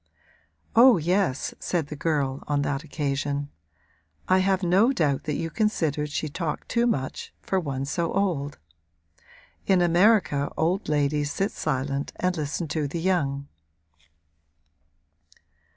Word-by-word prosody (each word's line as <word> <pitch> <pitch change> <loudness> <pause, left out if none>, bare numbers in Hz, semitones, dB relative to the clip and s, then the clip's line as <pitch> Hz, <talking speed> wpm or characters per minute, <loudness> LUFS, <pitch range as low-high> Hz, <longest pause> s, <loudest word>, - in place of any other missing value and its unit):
'Oh 240 -1 +8
yes,' 175 -3 0
said 165 -5 -2
the 150 - -5
girl, 140 -3 -1
on 145 -1 +1
that 140 +1 -2
occasion, 145 -2 -2 0.8
'I 185 0 +4
have 190 0 +1
no 190 +8 +4
doubt 150 - 0
that 150 - -1
you 165 +1 -3
considered 155 -9 0
she 155 - -2
talked 155 +1 -4
too 235 +1 +1
much, 135 - -2
for 190 - 0
one 135 -5 -3
so 165 +3 -1
old. 165 -8 -1 1.1
In 190 -2 +4
America 175 -4 +3
old 175 +4 0
ladies 145 0 +1
sit 195 +6 -1
silent 140 +2 -2
and 180 0 0
listen 155 +1 -3
to 150 -1 -1
the 165 +4 -4
young.' 145 -6 0
155 Hz, 130 wpm, -25 LUFS, 145-185 Hz, 1.1 s, Oh